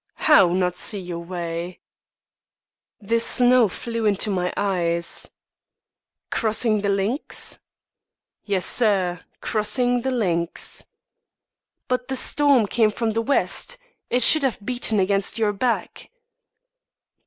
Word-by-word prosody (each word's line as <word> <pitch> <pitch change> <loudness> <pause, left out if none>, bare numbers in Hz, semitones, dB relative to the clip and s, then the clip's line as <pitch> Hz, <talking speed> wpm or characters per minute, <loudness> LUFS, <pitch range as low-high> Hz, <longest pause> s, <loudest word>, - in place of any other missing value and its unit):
"How, 245 - +6
not 180 0 0
see 205 - -2
your 175 -2 -6
way?" 170 0 -6 1.2
"The 230 +3 0
snow 245 0 +4
flew 230 +3 -3
into 205 +1 +1
my 180 -2 -1
eyes." 170 -4 -1 1.0
"Crossing 220 -1 0
the 200 - -1
links?" 200 +8 -2 0.8
"Yes, 195 -3 -1
sir, 190 -7 +1 0.2
crossing 245 +3 0
the 265 - -2
links." 175 -9 -2 1.0
"But 250 0 -2
the 265 - -3
storm 280 -4 +3
came 220 +1 +2
from 225 +1 -2
the 225 +1 -1
west. 285 - 0 0.3
It 245 0 +3
should 310 - +6
have 250 -7 -2
beaten 240 -3 +1
against 195 +2 +1
your 215 -2 +1
back." 235 +4 -3
210 Hz, 115 wpm, -22 LUFS, 185-245 Hz, 1.2 s, How